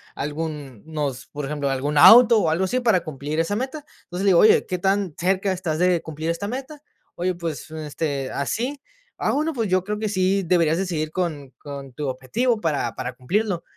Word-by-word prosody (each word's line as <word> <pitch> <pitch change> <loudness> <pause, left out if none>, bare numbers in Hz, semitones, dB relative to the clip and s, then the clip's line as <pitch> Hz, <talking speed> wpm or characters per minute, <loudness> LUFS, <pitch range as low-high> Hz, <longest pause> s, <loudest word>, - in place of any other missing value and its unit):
algún 145 -5 -5
nos 150 -5 -4
por 145 -1 -6
ejemplo, 145 0 -2
algún 140 +3 -1
auto 230 +8 +9
o 165 - +1
algo 165 +4 +1
así 250 +7 0
para 225 -7 +3
cumplir 150 +1 -4
esa 165 +5 0
meta. 270 +6 -4 0.2
Entonces, 180 +2 -5
le - - +5
digo: 175 -3 +5
"Oye, 215 - +6
¿qué 180 -1 -3
tan 195 -2 0
cerca 190 +2 +1
estás 175 -4 -2
de 180 0 +2
cumplir 160 +1 -5
esta 185 +4 -4
meta?". 270 +6 -6 0.3
"Oye, 180 +1 -1
pues, 165 -4 -5
este, 150 -3 -4
así". 245 - -2 0.4
"Ah, - - +1
bueno, 310 +3 0
pues 225 -6 -2
yo 185 0 +2
creo 210 +2 -3
que 215 -1 -1
sí 195 0 +1
deberías 165 -2 +2
de 195 - 0
seguir 155 -3 -2
con 155 -7 -3
con 140 -2 -8
tu 145 +2 -4
objetivo 215 - -1
para 145 - -1
para 125 - -4
cumplirlo". 180 - -1
170 Hz, 200 wpm, -23 LUFS, 150-200 Hz, 0.4 s, auto